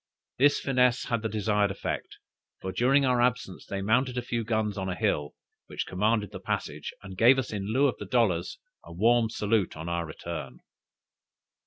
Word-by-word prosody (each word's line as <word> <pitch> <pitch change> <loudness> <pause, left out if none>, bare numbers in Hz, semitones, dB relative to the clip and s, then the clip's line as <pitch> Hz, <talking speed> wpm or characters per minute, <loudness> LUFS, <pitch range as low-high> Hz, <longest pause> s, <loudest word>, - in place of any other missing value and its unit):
This 145 +2 +5
finesse 125 -2 +2
had 120 -3 0
the 110 - -2
desired 105 -1 +1
effect, 95 - -4 0.4
for 95 - -4
during 135 +6 +3
our 125 -2 +2
absence 125 -6 -1
they 100 0 -3
mounted 125 +4 +1
a 125 - -1
few 120 -1 -2
guns 110 -2 -1
on 95 -2 -3
a 90 - -2
hill, 75 -4 -1 0.3
which - - -4
commanded 105 +3 0
the - - -7
passage, - - -4
and 95 -1 -9
gave 120 +7 +6
us 130 -4 -2
in 100 0 -3
lieu 135 +5 +3
of 130 - -3
the - - -6
dollars, 100 -9 +1 0.3
a - - -12
warm 115 +5 +3
salute 105 -5 0
on 80 +2 -6
our 85 -1 -2
return. 75 -5 -7
110 Hz, 185 wpm, -28 LUFS, 95-125 Hz, 0.4 s, gave